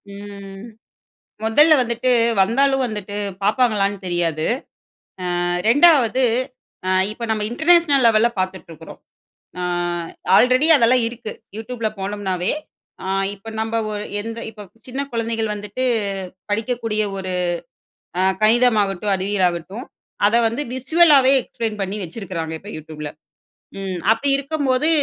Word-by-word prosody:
ம். 200 -1 -10 0.8
முதல்ல 295 +9 +5
வந்துட்டு 240 +1 0 0.3
வந்தாலும் 270 +6 +2
வந்துட்டு 210 -3 -5 0.3
பார்ப்பாங்களான்னு 205 -2 +1
தெரியாது. 170 -3 -1 1.0
ஆ - - 0 0.2
2ஆவது 265 -3 +5 0.7
ஆ - - +3 0.2
இப்ப 230 +2 -6
நம்ம 215 -1 0
இன்டர்நேஷனல் 315 -1 +4
லெவல்ல 225 +1 +4
பார்த்துட்டு 185 -2 -3
இருக்கிறோம். 160 0 -11 0.6
ஆ - - -3 0.7
ஆல்ரெடி 255 +4 +4
அதெல்லாம் 250 -1 +3
இருக்கு 235 -2 -8 0.2
YouTubeல 225 0 -3
போனோம்னாவே, 190 -2 -2 0.5
அ - - -5 0.3
இப்ப 205 +3 -13
நம்ப 225 +1 -2 0.2
ஒரு 210 0 -4 0.2
எந்த 225 +2 -6
இப்ப 210 -2 -11 0.2
சின்ன 260 +2 -4
குழந்தைகள் 225 -2 -2
வந்துட்டு 210 +5 -5 0.7
படிக்கக்கூடிய 225 0 -1 0.2
ஒரு 185 -1 -4 0.9
அ - - +3 0.2
கணிதமாகட்டும், 215 -4 +3
அறிவியலாகட்டும் 190 - -1 0.4
அத 215 - +2
வந்து 230 +5 -2
விஸ்வலாவே 275 0 +5
எக்ஸ்ப்ளெயின் 225 -4 -5
பண்ணி 195 +2 -3
வச்சிருக்கிறாங்க 170 -3 -5
இப்ப 205 +4 -10
YouTubeல. 150 -1 -8 0.7
ம் 190 -2 -4
அப்படி 225 +6 +1
இருக்கும் 285 +1 -3
போது 255 +5 +2
220 Hz, 115 wpm, -20 LUFS, 195-250 Hz, 1.0 s, முதல்ல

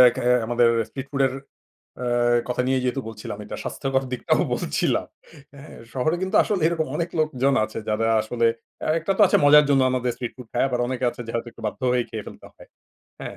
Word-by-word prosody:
খা 130 - -3 0.2
আমাদের 120 0 +3 0.2
স্ট্রিট 135 0 -7
ফুডের 135 -2 +2 0.7
আ - - -2 0.4
কথা 125 0 0
নিয়েই 130 0 +1
যেহেতু 125 +2 0
বলছিলাম 105 -2 -7
এটা 105 - -7
স্বাস্থ্যকর 135 -1 -1
দিকটাও 125 - +1
বলছিলাম। - - -1 0.5
হ্যাঁ, 140 +2 -12 0.2
শহরে 145 +6 0
কিন্তু 190 +3 0
আসলে 200 -6 -1
এরকম 165 -1 0
অনেক 170 +1 -1
লোকজন 140 -3 +1
আছে 110 - -7
যারা 110 +1 +1
আসলে 115 +2 0 0.5
একটা 170 +5 -1
তো - - +1
আছে - - +3
মজার 150 +1 +8
জন্য 135 -1 +4
আমাদের 125 -1 0
স্ট্রিট 120 -1 -5
ফুড 125 -2 -11
খায় 120 - +1
আবার 125 -1 -1
অনেকে 130 0 -3
আছে 120 - -12
যে - - -5
হয়তো 115 +1 -2
একটু - - -15
বাধ্য 105 - -5
হয়েই 125 -1 +1
খেয়ে 110 -3 -5
ফেলতে - - -11
হয়। - - -16 0.5
হ্যাঁ? - - -7
130 Hz, 200 wpm, -23 LUFS, 120-140 Hz, 0.7 s, মজার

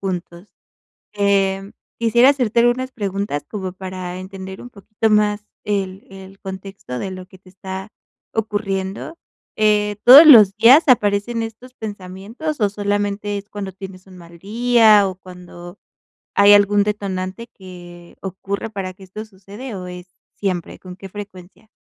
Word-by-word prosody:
juntos. 180 0 -6 0.6
Em, 195 -1 0 0.3
quisiera 235 +3 +5
hacerte 245 -5 +1
algunas 250 +2 +1
preguntas 200 - -3
como 190 -4 -5
para 185 -1 -7
entender 190 0 -9
un 245 - -11
poquito 215 +1 -3
más 210 0 +2 0.2
el 195 -2 -3
el 195 0 -13
contexto 190 -8 -8
de 190 - -4
lo 185 -1 -9
que 190 - -17
te 185 - -21
está 190 +1 -8 0.4
ocurriendo. 205 - -3 0.4
Eh, 210 -1 +2
¿todos 275 +6 +10
los 215 -9 +8
días 245 +9 +7
aparecen 225 -1 +2
estos 225 +3 -9
pensamientos, 210 +8 -7
o 205 -2 +2
solamente 205 0 -2
es 200 +1 -8
cuando 200 -2 -6
tienes 190 0 -11
un 185 -1 -15
mal 170 -1 -14
día?, 220 +1 +4
o, 190 - -4
¿cuando 180 0 -12 0.6
hay 200 0 +7
algún 205 0 +4
detonante 200 +1 -4
que 175 -4 -13
ocurra 195 +3 -5
para 195 -3 -5
que 190 - -17
esto 200 +4 -9
sucede, 205 +4 -10
o 180 -1 -7
es 180 0 -9 0.3
siempre? 185 -4 -4
¿Con 180 -1 -11
qué 195 +1 -11
frecuencia? 195 0 -11
200 Hz, 145 wpm, -19 LUFS, 190-215 Hz, 0.6 s, todos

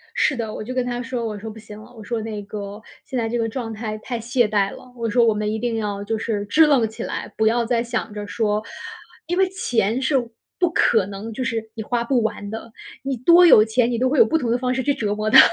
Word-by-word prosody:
是 275 - +2
的， 225 -3 -4
我 - - -5
就 255 +4 -5
跟 255 -1 0
他 245 0 -3
说， 240 -1 -3
我 210 -2 -4
说： 220 +2 -7
“不 220 - -11
行 210 0 -11
了”， 245 +3 -15
我 220 - -10
说： 230 0 -3
“那 215 -2 -5
个， 205 +1 -7 0.2
现 265 -5 -4
在 225 -1 0
这 240 - -1
个 225 -1 0
状 225 -1 -4
态 215 0 -4
太 240 +1 -4
懈 240 0 +1
怠 200 -2 +1
了”， 250 - -14
我 230 -1 -2
说： 235 +1 +4
“我 220 - +4
们 210 0 -2
一 220 - -2
定 240 -2 -1
要 205 -2 -3
就 220 +2 -2
是 210 -2 -2
支 310 +10 +5
棱 255 -6 +4
起 220 - -7
来。 - - -5
不 220 0 +3
要 235 +1 +2
再 235 -1 +1
想 225 -2 -3
着 205 -1 -6
说 215 -1 0 0.6
因 350 +2 -1
为 380 -1 +4
钱 245 - 0
是 270 +1 +2 0.4
不 355 -2 +3
可 220 - +3
能 205 +3 -7
就 255 - -3
是 225 -2 -3
你 220 - -4
花 235 +1 -1
不 245 0 +1
完 210 -2 -3
的， 225 +1 -7 0.3
你 270 -1 -1
多 340 +8 +6
有 215 -10 +8
钱 230 +2 +1
你 235 - -1
都 255 +2 +2
会 295 - 0
有 - - +8
不 320 - +1
同 240 -6 -1
的 240 - +2
方 250 0 -1
式 260 0 -1
去 285 - +2
折 210 -4 -2
磨 215 +1 -1
它。” 265 - +9
230 Hz, 295 characters per minute, -22 LUFS, 215-250 Hz, 0.6 s, 它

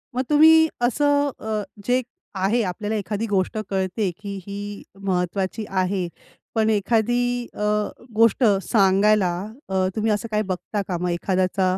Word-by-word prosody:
मग 255 - +1
तुम्ही 320 +2 +7
असं 285 +3 +2
अ, 215 -1 -2 0.2
जे 250 +1 +3 0.4
आहे 205 +6 +2
आपल्याला 210 +4 -3
एखादी 210 +2 -2
गोष्ट 195 +2 0
कळते, 190 +1 -1
की 200 -1 -6
ही 205 +1 -6 0.2
महत्त्वाची 190 +2 -1
आहे. 185 -1 0 0.5
पण 220 0 +2
एखादी 240 +3 +1
अ, - - -11 0.6
गोष्ट 230 +3 +4 0.2
सांगायला 195 -1 +3 0.4
अ, 190 -1 +1
तुम्ही 220 0 +1
असं 210 +3 -1
काही 210 - +1
बघता 195 +2 -3
का? 180 - -2
मग 180 +1 -2
एखाद्याचा 185 +1 0
205 Hz, 140 wpm, -23 LUFS, 190-230 Hz, 0.6 s, तुम्ही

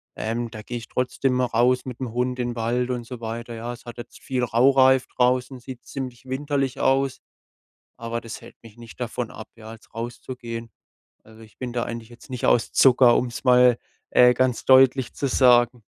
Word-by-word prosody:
Ähm, 115 +1 -3
da 110 - -8
gehe 120 +3 -5
ich 115 - -9
trotzdem 125 0 -1
raus 125 +1 +2
mit 125 -3 -7
'm 125 - -4
Hund 125 +1 -1
in 120 -1 -2
Wald 120 +2 -1
und 120 -1 -4
so 120 0 -9
weiter, 115 +1 -6
ja. 115 +2 -5
Es 120 - -14
hat 120 0 -9
jetzt 120 0 -10
viel 130 -2 -2
Raureif 130 +2 +4
draußen, 125 +1 0
sieht 125 0 -10
ziemlich 130 -2 -7
winterlich 135 0 -2
aus, 135 -1 +1 0.8
aber 115 0 -4
das 115 -1 -8
hält - - -14
mich 115 -1 -15
nicht 115 -1 -13
davon 120 0 -4
ab, 110 - -10
ja, 110 0 -11
jetzt 110 - -18
rauszugehen. 120 0 -7 0.6
Also, 110 +1 -16
ich 110 - -18
bin 125 -2 -5
da 120 -1 -1
eigentlich 115 -1 -7
jetzt 120 +3 -16
nicht 125 -2 -3
aus 120 - +2
Zucker, 125 -2 +5
um's 120 0 -3
mal, 125 -1 +5 0.3
äh, 125 0 +6
ganz 130 -1 0
deutlich 130 -1 +5
zu 140 - -2
sagen. 120 -2 +4
125 Hz, 190 wpm, -23 LUFS, 115-130 Hz, 0.8 s, äh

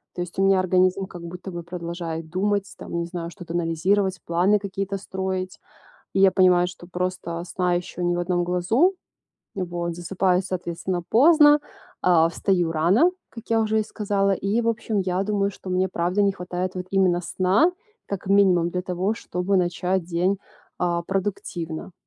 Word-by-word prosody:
То 175 - -3
есть, 175 +1 -6
у 195 - +4
меня 195 -1 +4
организм 185 +1 +2
как 175 -2 -10
будто 180 +3 -7
бы 175 -1 -6
продолжает 170 -2 -5
думать, 200 +3 -1
там - - -6
не 170 - -2
знаю, 170 -1 -5
что-то 170 -1 -9
анализировать, 180 +3 +1
планы 180 +5 +3
какие-то 195 0 -3
строить. 190 -1 -4 0.5
И - - +1
я 190 -1 +7
понимаю, 180 -2 +4
что 175 0 -10
просто 180 -2 -3
сна 180 0 0
ещё 175 0 -4
ни 175 0 +1
в - - -1
одном 175 0 0
глазу, 220 - +2 0.6
м, 185 - -1
вот 170 0 -3
засыпаю 180 +1 +1
соответственно 175 -1 -3
поздно, 295 +3 +6 0.4
а 165 -2 +5
встаю 175 -1 0
рано, 180 - +4 0.2
как 230 -2 -10
я 225 0 +3
уже 220 0 +1
и 215 - -2
сказала. 200 -2 0
И, 200 +4 0
в 230 - 0
общем, 225 -2 -1
я 185 0 0
думаю, 200 -1 0
что 190 - -11
мне, 185 +1 +1
правда, 180 +3 0
не 200 -1 +3
хватает, 180 0 -4
вот 180 0 -5
именно 185 -3 +3
сна, 185 - +2 0.3
как 200 -2 -5
минимум 190 -3 +4
для 180 +1 -2
того, 185 +3 -1
чтобы 190 -2 -1
начать 180 +1 0
день, 180 +3 0 0.4
а, 170 -1 0
продуктивно. 180 -3 -4
185 Hz, 175 wpm, -24 LUFS, 175-195 Hz, 0.6 s, я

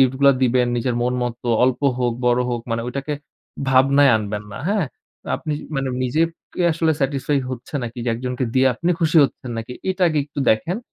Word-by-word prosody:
gift 130 -1 +4
গুলা 140 0 +7
দিবেন, 125 0 +3
নিজের 120 0 0
মন 125 +1 +1
মতো 120 0 -4 0.2
অল্প 130 +1 +1 0.2
হোক, 120 -1 +1
বড় 125 0 +3
হোক, 120 -1 -2
মানে 115 0 0
ঐটাকে 140 +4 -4 0.6
ভাবনায় 135 +1 +5
আনবেন 105 -1 -3
না - - -7
হ্যাঁ? 200 -7 +1 0.4
তো - - -23
আপনি 155 -2 -4
জি - - -10
মানে 135 0 -1
নিজেপ 155 +7 +2 0.3
কে - - -4
আসলে 160 0 +1
satisfy 140 +1 0
হচ্ছে 125 +3 -8
নাকি? 120 +1 -6
যে - - -1
একজনকে 125 +2 -3
দিয়ে 130 0 +4
আপনি 170 +7 -1
খুশি 165 0 +2
হচ্ছেন 125 -1 -5
নাকি, 115 +2 -6 0.2
এটা 185 0 -2
আগে 155 -2 0
একটু 145 -1 -6
দেখেন। 165 - -2
130 Hz, 205 wpm, -21 LUFS, 120-145 Hz, 0.6 s, গুলা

